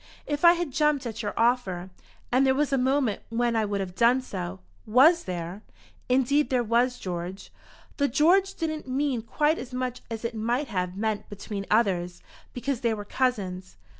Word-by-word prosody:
If 290 +1 -3
I 340 0 +9
had 345 -4 -3
jumped 300 -1 +1
at 225 -1 -4
your 205 -2 -4
offer, 200 -7 +1 0.4
and 255 +2 +4
there 265 -1 +3
was 285 0 0
a - - +4
moment 260 -4 +1
when 235 0 0
I 220 -1 +2
would 200 -1 -2
have 185 -2 -5
done 235 +6 +4
so 90 - -5
" 90 - -33 0.2
"Was 335 +2 +5
there?" 180 +2 -5 0.5
"Indeed 270 +3 +2
there 250 -2 +2
was, 240 +2 +2
George." 180 +1 -6 0.4
The 285 - +2
"George" 365 +9 +3
didn't 310 -3 -3
mean 260 -2 0
quite 300 +7 +1
as 250 0 -8
much 255 -1 -3
as 225 0 -5
it 230 - -2
might 235 +5 -1
have 180 -2 -2
meant 215 0 -2
between 205 -1 -6
others, 185 -6 +1 0.3
because 255 0 -3
they 230 -2 +1
were 205 -1 -7
cousins. 195 -7 -2
240 Hz, 185 wpm, -26 LUFS, 200-275 Hz, 0.5 s, I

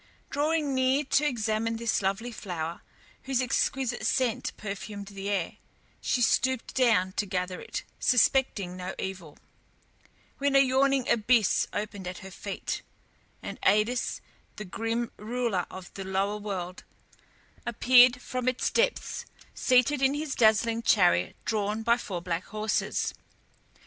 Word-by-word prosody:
Drawing 295 0 +1
near 260 +2 +2
to 295 +1 +2
examine 225 -3 -1
this 230 -1 0
lovely 200 +5 -1
flower, 170 -6 -5 0.4
whose 265 -2 0
exquisite 255 0 0
scent 255 -4 0
perfumed 200 0 -6
the 200 0 -5
air, 195 -5 -1 0.4
she 245 - +1
stooped 260 +1 +1
down 225 -8 +3
to 205 +2 -2
gather 180 0 -3
it, - - -5 0.2
suspecting 245 -7 +2
no 185 +1 -5
evil, 185 -5 -6 1.0
when 280 0 +1
a - - +8
yawning 270 0 +3
abyss 230 -1 +3
opened 205 -3 -4
at 180 - -5
her 190 - -9
feet, 195 +1 -4 0.6
and - - -7
Aïdes, 220 +4 +2 0.3
the 210 - -7
grim 225 +5 -2
ruler 225 -4 -1
of 185 -1 -10
the 195 - -6
lower 195 +2 -1
world, 190 -4 -5 0.8
appeared 245 +2 +5
from 255 0 -4
its 255 -1 +1
depths, - - 0 0.3
seated 255 +2 +3
in 270 +1 +3
his 295 -2 -3
dazzling 225 +1 +3
chariot 180 - +3
drawn 215 0 -1
by 235 +1 +4
four 185 -7 -5
black 175 0 -2
horses. 215 0 -1
225 Hz, 135 wpm, -28 LUFS, 195-255 Hz, 1.0 s, a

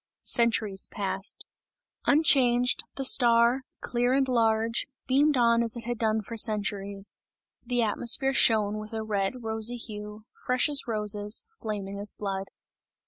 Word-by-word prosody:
Centuries 220 -4 +1
passed. 195 -2 -5 0.6
Unchanged, 250 -5 +3
the 270 - -1
star, 240 0 +5 0.2
clear 245 +1 0
and 270 0 +2
large, 230 -2 +1 0.2
beamed 285 +2 +3
on 235 -1 +3
as 235 0 0
it 235 - -6
had 240 -2 -4
done 220 -1 0
for 230 - -8
centuries. 205 -2 -1 0.4
The 245 -1 0
atmosphere 240 +5 +1
shone 215 -4 +3
with 215 +1 -9
a 220 0 -3
red 210 +3 -2
rosy 225 +2 +1
hue, 210 -1 -8 0.2
fresh 255 +3 +1
as 285 -2 +1
roses, 210 -1 -1
flaming 205 - -6
as 205 0 -4
blood. 195 -1 -4
225 Hz, 140 wpm, -27 LUFS, 210-245 Hz, 0.6 s, star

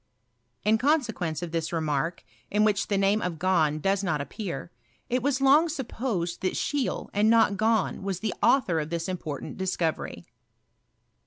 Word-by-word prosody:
In 220 +1 +3
consequence 225 - 0
of 170 - -5
this 165 -1 -2
re 165 - 0
mark, 155 +2 -1 0.3
in 210 +1 +2
which 205 -2 +2
the 200 - +1
name 200 +2 +2
of 180 -2 -2
Gahn 160 -4 +2
does 195 +4 +1
not 160 -6 0
appear, 170 +1 -5 0.4
it 250 +1 +1
was 275 +1 0
long 290 +5 +5
supposed 225 - -3
thai 185 - 0
Scheele, 285 -3 -2
and 210 +2 +3
not 225 -2 +5
Gahn, 220 -1 +1
was 195 -2 -3
the 215 -2 -2
author 190 -12 +3
of 150 0 -3
this 170 +1 -3
important 165 -6 -5
discovery. 180 -4 -2
195 Hz, 165 wpm, -27 LUFS, 170-225 Hz, 0.4 s, long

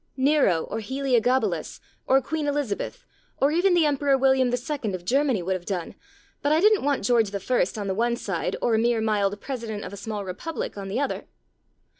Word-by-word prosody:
Nero 265 - +3
or - - -4
Heliogabalus 260 +1 0 0.3
or 270 +1 +5
Queen 310 +1 -2
Elizabeth, 285 -8 -2 0.3
or 280 +2 +3
even 355 +3 +3
the 335 -3 +4
Emperor 280 -1 +2
William 265 -1 +3
II. 245 -4 -2
of 175 -1 -9
Germany 260 -4 +2
would 190 +2 0
have 185 -2 -4
done, 180 -4 -3 0.5
but 290 - +1
I 310 - +4
didn't 425 +2 +4
want 280 -7 0
George 225 -3 +3
I. 200 +2 +1 0.2
on - - -3
the 190 - -1
one 235 +4 +1
side 195 -7 -3
or 235 - +2
a 220 - +3
mere 235 0 +2
mild 205 -2 0
President 230 -5 -5
of 185 - -8
a - - -7
small 205 0 -5
republic 210 - -5
on 200 -1 -6
the 195 +6 -2
other. 280 - -2
245 Hz, 195 wpm, -25 LUFS, 205-280 Hz, 0.5 s, or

